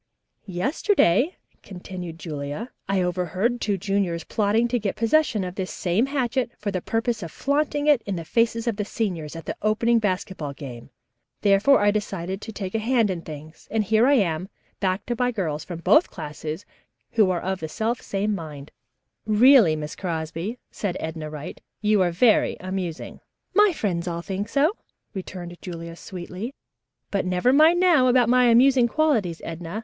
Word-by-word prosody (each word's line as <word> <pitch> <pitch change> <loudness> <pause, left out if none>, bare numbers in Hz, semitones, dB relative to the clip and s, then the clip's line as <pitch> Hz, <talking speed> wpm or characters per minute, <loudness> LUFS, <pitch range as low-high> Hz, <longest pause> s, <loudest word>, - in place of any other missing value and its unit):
"Yesterday," 255 - +2 0.2
continued 180 -3 -8
Julia, 150 - -5 0.2
"I 195 -2 +2
overheard 185 +7 -1
two 205 -2 0
juniors 190 -3 -1
plotting 220 +5 +1
to 245 0 +1
get 205 -3 -2
possession 230 -2 +2
of 180 -1 -4
this 185 -1 -4
same 195 +8 0
hatchet 260 -3 0
for 205 -1 -3
the 185 -2 -2
purpose 225 +2 -1
of 165 -3 -6
flaunting 290 - 0
it 295 -5 +5
in 200 - -1
the 165 -2 -5
faces 230 +5 +1
of 230 -4 -1
the 210 - -1
seniors 180 -8 -3
at 165 - -8
the - - -4
opening 230 +2 +2
basketball 185 -7 -2
game. 130 -5 -9 0.5
Therefore 205 +7 +5
I 205 0 +4
decided 195 -2 -3
to 220 - -7
take 195 -3 -5
a 225 - +1
hand 225 -2 +2
in 175 -2 -4
things, 155 0 -11
and 220 0 +1
here 220 +4 +3
I 285 - +5
am, 185 -5 0 0.3
backed 195 +5 -1
by 245 +1 +1
girls 165 -10 -2
from 170 -2 -7
both 310 - +5
classes, 155 +4 -6 0.5
who 215 -4 +4
are 180 -2 0
of 190 +1 -3
the 160 - -5
self 225 +7 -2
same 205 +2 -1
mind." 150 -6 -7 0.6
"Really, 220 - +6
Miss 150 0 -5
Crosby," 170 +5 -4
said 190 -4 -3
Edna 160 -1 -5
Wright, 150 -1 -8 0.2
"you 210 -1 +3
are 180 - +3
very 215 +7 +3
amusing." 185 -3 -5 0.3
"My 420 -1 +6
friends 185 - -2
all 170 -1 -3
think 200 +3 -4
so," 295 - +2 0.4
returned 180 -3 -7
Julia 170 -2 -7
sweetly, 185 - -7 0.6
"but 200 - 0
never 185 +7 +2
mind 315 +4 +6
now 340 -8 +5
about 245 -2 +4
my 250 0 +5
amusing 250 +1 +5
qualities, 230 - 0
Edna. 165 +4 -5
200 Hz, 170 wpm, -24 LUFS, 170-235 Hz, 0.6 s, Really